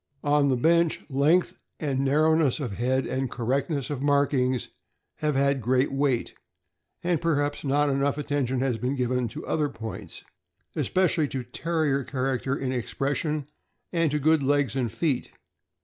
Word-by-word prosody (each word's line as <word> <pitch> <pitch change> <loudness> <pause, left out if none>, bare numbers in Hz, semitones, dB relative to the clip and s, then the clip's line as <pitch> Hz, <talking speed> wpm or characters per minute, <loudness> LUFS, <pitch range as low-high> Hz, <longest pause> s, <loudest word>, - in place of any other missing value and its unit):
On 145 -1 +3
the 130 - +3
bench, 170 +4 +2
length 150 +7 +2 0.2
and 140 -4 -1
narrowness 150 +1 +3
of 130 -7 -3
head 130 +2 +1
and 130 0 -2
cor 120 0 -5
rectness 140 +3 -1
of 140 -3 -3
markings 140 -3 +1 0.5
have 150 -2 0
had 140 0 +2
great 130 +4 +2
weight, 135 -3 0 0.7
and 175 -2 +1
perhaps 145 -3 0
not 145 +1 +2
enough 140 +1 +1
attention 140 -3 -1
has 125 -4 0
been 130 +3 -1
given 125 -1 0
to 110 - -8
other 150 -2 0
points, 110 -4 -8 0.5
espe 185 0 +2
cially 160 -5 +1
to 130 -2 -3
Terrier 145 +1 -1
character 130 0 -1
in 135 -2 -2
expression, 140 +4 -2 0.5
and 165 -2 +2
to 150 - 0
good 155 +1 +3
legs 140 -2 +1
and 125 -5 -1
feet. 145 -2 -1
140 Hz, 155 wpm, -26 LUFS, 130-150 Hz, 0.7 s, On